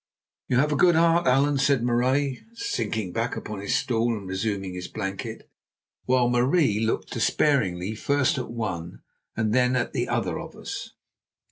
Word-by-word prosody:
"You 125 - +1
have 150 +4 +3
a - - +2
good 175 +3 +5
heart, 170 +1 +3
Allan," 140 +2 +3
said 135 -3 +2
Marais, 130 +2 +1
sinking 110 - -2
back 115 +2 -1
upon 105 -2 -6
his 100 +5 -1
stool 120 -4 +1
and 100 -2 -8
resuming 95 0 -2
his 90 0 -5
blanket, 95 0 -5 0.6
while 125 -1 +3
Marie 125 - +2
looked 110 0 -1
despairingly 100 -10 +1
first 140 +4 +1
at 125 - -5
one 95 -8 -5 0.3
and 110 -1 +1
then 125 0 +3
at 125 - -1
the - - -1
other - - -1
of - - -9
us. - - -7
120 Hz, 160 wpm, -25 LUFS, 105-135 Hz, 0.6 s, good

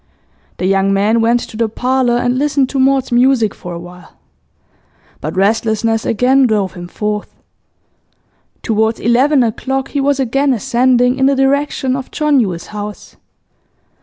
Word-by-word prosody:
The 180 - -3
young 195 +1 +2
man 210 +4 +2
went 235 +1 +2
to - - -9
the 225 0 -1
parlour 250 +1 0
and 245 +1 0
listened 280 -2 +1
to 275 - -2
Maud's 265 -1 +2
music 240 -3 +2
for 175 - -9
awhile. 175 0 -12 1.1
But 155 +3 -5
restlessness 220 +2 0
again 255 +4 +3
drove 205 -4 -1
him 175 -1 -9
forth. 210 +3 -4 1.3
Towards 220 0 0
eleven 260 +4 +3
o'clock 265 +4 -2
he 285 - -2
was 280 0 +1
again 270 +2 +1
ascending 250 +3 +1
in 265 - +3
the 275 - +2
direction 270 -1 0
of 265 -1 -6
John 300 -2 +1
Yule's 185 -7 -2
house. 210 0 -8
240 Hz, 145 wpm, -15 LUFS, 210-265 Hz, 1.3 s, again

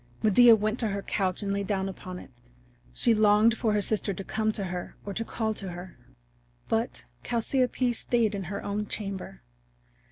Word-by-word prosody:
Medea 230 +2 +7
went 215 +2 -1
to 225 - +1
her 200 -1 -3
couch 190 0 -1
and 200 0 -1
lay 200 - 0
down 195 -1 -1
upon 185 -1 -7
it. 140 - -11 0.6
She 235 - +2
longed 215 +1 +5
for 225 -2 0
her 210 -1 +1
sister 210 -2 0
to 195 - -5
come 220 +2 0
to 200 - -2
her 180 -1 -5
or 200 - -4
to 230 - -2
call 220 -1 -2
to 195 -3 -4
her. 175 +1 -9 0.7
But - - -1 0.2
Chalciope 250 +1 0
stayed 230 -2 +1
in 195 -2 -4
her 200 +3 -5
own 205 +1 -2
chamber. 195 - -5
210 Hz, 185 wpm, -28 LUFS, 195-220 Hz, 0.7 s, Medea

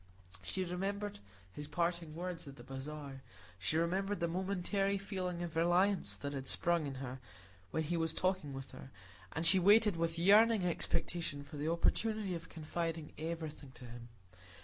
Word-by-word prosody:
She 95 - -2
remembered 200 - -2 0.3
his 150 0 -5
parting 170 0 -1
words 175 -2 -4
at 135 - -8
the - - -12
bazaar. 135 0 -7 0.4
She 125 +11 0
remembered 190 +5 +1
the 170 - +1
momentary 195 +2 0
feeling 185 -3 -3
of 170 -2 -5
reliance 175 +4 +3
that 140 0 -4
had 135 -1 -4
sprung 170 -3 +2
in 135 - -4
her 130 0 -5 0.5
when 160 - 0
he 170 +3 -1
was 165 -1 0
talking 185 -6 0
with 135 0 -7
her, - - -10 0.4
and 160 +2 -2
she 185 +3 +7
waited 205 0 +6
with 165 0 0
yearning 205 +3 +6
expectation 165 -3 -1
for 145 +1 -9
the 150 +2 -1
opportunity 210 +4 +1
of 165 -1 -6
confiding 165 0 -3
everything 155 -4 -5
to 125 - -11
him. 120 0 -9
170 Hz, 165 wpm, -35 LUFS, 150-185 Hz, 0.5 s, she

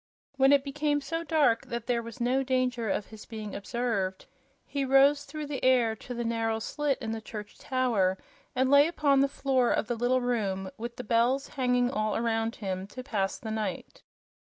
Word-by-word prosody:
When 270 0 +5
it 280 -1 +5
became 295 +1 0
so 330 +4 -3
dark 290 -7 +2
that 235 -1 -4
there 240 -1 0
was 230 +1 -9
no 250 +3 +2
danger 255 -3 0
of 200 - -1
his 220 -1 -12
being 215 -3 -6
observed, 200 -4 -2 0.4
he 280 -1 -2
rose 275 +2 +4
through 300 +1 -6
the 285 -2 -5
air 245 -4 +4
to 245 - -7
the 240 - -2
narrow 225 -1 0
slit 280 +5 -1
in 225 -4 -4
the 225 0 -4
church 210 -2 -9
tower 230 -8 +1 0.4
and 260 +1 +2
lay 285 +1 +7
upon 290 -5 +2
the 275 - +4
floor 265 -3 +1
of - - +1
the 240 +1 -2
little 245 +2 +1
room, 200 -6 -1
with 235 +1 -6
the 250 - -6
bells 240 +5 +1
hanging 250 -2 +1
all 215 -4 -1
around 225 0 0
him, 190 -2 -4
to 255 +5 -8
pass 205 -7 -1
the 220 - -6
night. 210 -5 -4
245 Hz, 195 wpm, -29 LUFS, 220-270 Hz, 0.4 s, lay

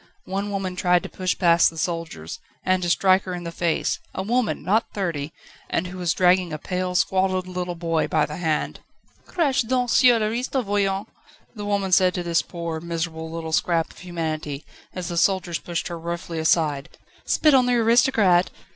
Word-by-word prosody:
One 195 +2 -3
woman 195 -2 -3
tried 180 -1 +2
to - - -6
push 185 -1 -2
past 170 -2 +5
the 165 - -13
soldiers, 160 - -4 0.3
and 185 0 +2
to 175 - -1
strike 185 +2 +4
her 185 -1 -4
in 175 - -6
the 170 - -5
face 170 -1 -1 0.2
a 190 - -2
woman! 240 +2 0
not 215 +5 +1
thirty! 165 -7 -2 0.4
and 170 - 0
who 180 +1 -7
was 175 -2 0
dragging 180 -1 +3
a 155 - -3
pale, 180 +3 -3
squalid 185 0 +1
little 180 -1 -4
boy 165 -1 0
by 155 -2 +2
the 150 - -7
hand. 160 -3 -1 0.5
"Crache 285 -7 +1
donc 250 -1 +1
sur 250 -2 +6
l'aristo, 240 +4 -1
voyons!" 200 -1 0 0.5
the 210 -3 -6
woman 200 -2 -1
said 185 0 +4
to 180 - -2
this 170 -1 +1
poor, 170 -2 -5
miserable 160 -1 -4
little 165 0 -5
scrap 165 0 +1
of - - -16
humanity 155 -4 -4 0.3
as 185 -2 -4
the 170 - -4
soldiers 180 -2 +1
pushed 170 -1 -4
her 170 -1 -6
roughly 170 0 -5
aside. 155 -3 +1 0.3
"Spit 305 -2 +3
on 255 -2 +5
the 245 - +3
aristocrat!" 225 -6 +4
180 Hz, 185 wpm, -23 LUFS, 165-195 Hz, 0.5 s, sur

